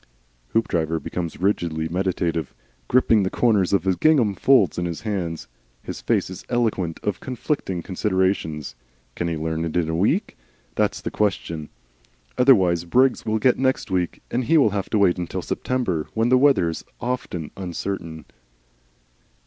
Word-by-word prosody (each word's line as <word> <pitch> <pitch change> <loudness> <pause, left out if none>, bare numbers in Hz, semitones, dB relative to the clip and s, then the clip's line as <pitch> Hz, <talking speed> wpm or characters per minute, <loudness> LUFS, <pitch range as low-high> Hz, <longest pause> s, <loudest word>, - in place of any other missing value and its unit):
Hoopdriver 80 -7 +1
becomes 85 -1 -5
rigidly 85 -5 0
meditative, 85 -3 -2 0.3
gripping 115 -4 +4
the 95 - 0
corners 105 -6 +2
of 100 -4 +2
the 95 0 +2
gingham 130 - +3
folds 100 - +3
in 90 - -1
his 85 -2 -4
hands. 90 -7 -3 0.4
His - - -6
face - - +1
is 95 - -8
eloquent 110 -9 0
of 105 -1 -1
conflicting 125 - -3
considerations. 95 -6 -1 0.4
Can 85 - -3
he 85 -1 -2
learn 80 +1 -2
it 85 +1 -2
in 80 -2 +1
a 80 - -1
week? 130 - 0 0.3
That's - - 0
the - - -4
question. 85 -7 -2 0.7
Otherwise 95 -10 +4
Briggs 125 +9 +2
will 110 0 +1
get 125 +3 +2
next 130 -5 0
week, 90 -2 -1
and 125 +1 0
he 165 +7 +4
will 130 -8 +4
have 100 -1 -3
to 110 - +1
wait 95 -3 +3
until 85 - -4
September 105 -12 -2
when 115 +2 +2
the 130 - +6
weather 135 -10 +4
is 80 - -5 0.2
often 120 -10 -4
uncertain. 85 -3 -5
95 Hz, 155 wpm, -23 LUFS, 85-115 Hz, 0.7 s, the